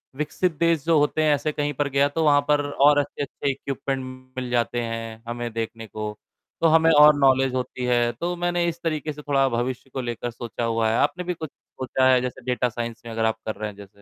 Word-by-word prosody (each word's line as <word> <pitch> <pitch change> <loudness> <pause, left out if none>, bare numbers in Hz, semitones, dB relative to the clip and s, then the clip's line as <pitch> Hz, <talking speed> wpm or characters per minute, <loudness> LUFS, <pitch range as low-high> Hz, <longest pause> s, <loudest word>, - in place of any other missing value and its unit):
विकसित 160 +4 -1
देश 165 -3 +2
जो 165 -1 +4
होते 150 +2 +1
हैं, 150 -1 +4
ऐसे 155 +2 -2
कहीं 145 0 -2
पर 145 +2 -1
गया 140 +1 +3
तो 160 +2 -1
वहाँ 145 -1 +5
पर 145 0 +4
और 145 +1 +5
अच्छे-अच्छे 140 0 -2
इक्विपमेंट 135 0 -4 0.4
मिल 125 -1 -4
जाते 120 0 0
हैं 115 -1 -5
हमें 120 0 -4
देखने 115 0 -5
को, 105 +1 -6 0.4
तो 165 - +5
हमें 160 +1 +5
और 150 -1 +8
नॉलेज 135 -1 +4
होती 125 0 -3
है। 120 -1 +2
तो 175 +9 -3
मैंने 175 0 0
इस 170 0 -7
तरीके 155 -2 -2
से 150 - -10
थोड़ा 140 -2 +2
भविष्य 120 +2 -3
को 130 - -2
लेकर 120 0 -4
सोचा 120 0 -6
हुआ 115 -1 +1
है, 110 - +1
आपने 180 0 +1
भी 180 0 -2
कुछ 160 -3 -7
सोचा 130 0 -2
है? 125 - +4
जैसे 125 0 -5
डाटा 125 0 0
साइंस 120 0 -5
में 115 - -7
अगर 110 0 -1
आप 110 0 +1
कर 110 - -3
रहे 110 0 -4
हैं 105 - -12
जैसे? 100 -1 -11
130 Hz, 230 wpm, -24 LUFS, 120-150 Hz, 0.4 s, और